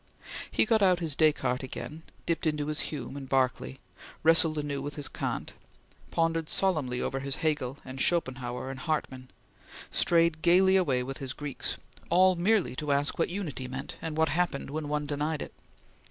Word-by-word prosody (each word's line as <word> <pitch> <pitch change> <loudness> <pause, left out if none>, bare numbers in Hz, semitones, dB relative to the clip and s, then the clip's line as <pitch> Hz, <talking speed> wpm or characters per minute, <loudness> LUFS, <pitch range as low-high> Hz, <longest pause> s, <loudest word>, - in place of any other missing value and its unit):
He - - +3
got 220 -1 +3
out 185 -2 +5
his 160 -5 0
Descartes 135 -5 +2
again; 150 +4 -7 0.2
dipped 170 0 0
into 150 -1 0
his 150 0 -2
Hume 140 -3 -5
and 135 -2 -7
Berkeley; 130 0 0 0.4
wrestled 165 -1 +4
anew 145 -2 -2
with 145 +1 -5
his 145 -2 -3
Kant; - - -4 0.6
pondered 165 -1 0
solemnly 150 -10 +1
over 135 - -2
his 135 0 -2
Hegel 145 -4 -1
and 130 +1 -5
Schopenhauer 130 -6 0
and 135 - -7
Hartmann; 135 -5 -3 0.6
strayed 165 -2 +3
gaily 185 +3 +5
away 135 -10 +2
with 135 +1 -6
his 135 -2 -4
Greeks 145 -2 -4 0.3
all 185 +2 +5
merely 180 - +2
to 150 -1 -1
ask 140 +3 +1
what - - +2
Unity 165 -9 -4
meant, 135 +3 -6
and 160 -1 -4
what 160 -1 +3
happened 160 -3 -1
when 155 0 -3
one 150 0 -1
denied 150 +1 -2
it. - - -10
150 Hz, 170 wpm, -29 LUFS, 135-165 Hz, 0.6 s, out